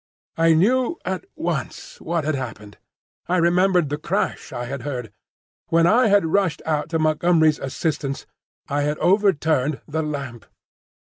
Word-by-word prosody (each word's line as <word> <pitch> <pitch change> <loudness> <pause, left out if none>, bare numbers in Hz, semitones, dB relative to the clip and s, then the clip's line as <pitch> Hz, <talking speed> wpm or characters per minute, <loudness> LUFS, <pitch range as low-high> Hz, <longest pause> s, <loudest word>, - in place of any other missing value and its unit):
I 165 0 +4
knew 250 - +2
at 190 - -3
once - - -4
what 170 -2 -1
had 155 +1 0
happened. 110 -6 -7 0.5
I 180 - +1
remembered 175 -1 +3
the 145 +1 -3
crash - - -2
I 120 -1 -4
had 135 +1 -5
heard. 125 -5 -5 0.5
When 165 0 +3
I 230 +7 +4
had 200 -3 +4
rushed 165 -2 0
out 155 -1 -1
to 165 - 0
Montgomery's 155 0 +3
assistance, 140 0 -3 0.4
I 145 +1 -1
had 150 +1 -1
overturned 160 -8 +2
the 160 +2 -2
lamp. 140 -7 -5
160 Hz, 145 wpm, -22 LUFS, 140-180 Hz, 0.5 s, I